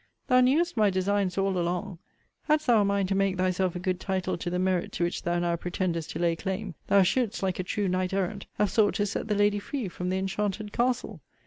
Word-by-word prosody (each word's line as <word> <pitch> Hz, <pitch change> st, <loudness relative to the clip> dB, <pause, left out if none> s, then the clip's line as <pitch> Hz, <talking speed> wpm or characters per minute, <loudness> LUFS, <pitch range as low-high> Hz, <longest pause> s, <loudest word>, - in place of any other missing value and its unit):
Thou 255 Hz, -1 st, +5 dB
knewest 300 Hz, +7 st, +2 dB
my 215 Hz, -3 st, +4 dB
designs 190 Hz, 0 st, 0 dB
all 195 Hz, -1 st, +1 dB
along. 175 Hz, +1 st, -2 dB, 0.5 s
Hadst 305 Hz, 0 st, +2 dB
thou 235 Hz, -5 st, +5 dB
a -, -, +3 dB
mind 200 Hz, -1 st, +1 dB
to -, -, +1 dB
make 195 Hz, -1 st, +1 dB
thyself 185 Hz, 0 st, 0 dB
a -, -, -3 dB
good 185 Hz, 0 st, -1 dB
title 190 Hz, -1 st, -1 dB
to 170 Hz, +1 st, -4 dB
the 180 Hz, -, -1 dB
merit 185 Hz, -1 st, 0 dB
to -, -, -1 dB
which 175 Hz, -, -1 dB
thou 175 Hz, 0 st, 0 dB
now 175 Hz, 0 st, +1 dB
pretendest 170 Hz, -1 st, -2 dB
to -, -, -4 dB
lay 170 Hz, -1 st, +2 dB
claim, 190 Hz, +2 st, -4 dB
thou 200 Hz, -1 st, +5 dB
shouldest, 235 Hz, +2 st, 0 dB
like 185 Hz, -2 st, -1 dB
a -, -, 0 dB
true 200 Hz, +2 st, -1 dB
knight 185 Hz, 0 st, 0 dB
errant, 195 Hz, +1 st, -2 dB
have 210 Hz, -, +1 dB
sought 205 Hz, -4 st, +3 dB
to 205 Hz, -1 st, +1 dB
set 205 Hz, -, -3 dB
the 210 Hz, -, 0 dB
lady 205 Hz, 0 st, +3 dB
free 255 Hz, +1 st, -4 dB
from 180 Hz, 0 st, -4 dB
the 185 Hz, -, 0 dB
enchanted 205 Hz, +2 st, -2 dB
castle. 245 Hz, 0 st, -1 dB
190 Hz, 235 wpm, -27 LUFS, 180-210 Hz, 0.5 s, Thou